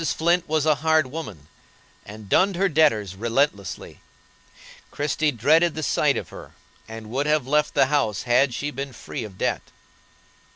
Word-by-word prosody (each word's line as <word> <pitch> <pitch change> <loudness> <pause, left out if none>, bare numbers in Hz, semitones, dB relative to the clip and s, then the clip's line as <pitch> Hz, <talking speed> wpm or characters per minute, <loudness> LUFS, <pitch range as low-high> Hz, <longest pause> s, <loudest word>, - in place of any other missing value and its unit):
Flint 170 +2 0
was 155 -1 +1
a 155 - +4
hard 160 -1 +3
woman, 110 - -8 0.6
and 105 0 -11
dunned 190 - +2
her 195 +3 +2
debtors 140 - +2
relentlessly; 115 -2 -2 0.9
Christie 150 +1 -1
dreaded 155 +7 +2
the 155 - -4
sight - - +1
of - - -6
her, - - -12 0.3
and 110 -1 -9
would 140 +4 -1
have 150 -3 +1
left 150 +2 0
the - - +5
house 130 -8 0
had 125 +2 +3
she 145 +5 -4
been 135 0 -6
free - - -7
of 100 -4 -10
debt. - - -1
145 Hz, 160 wpm, -23 LUFS, 110-155 Hz, 0.9 s, the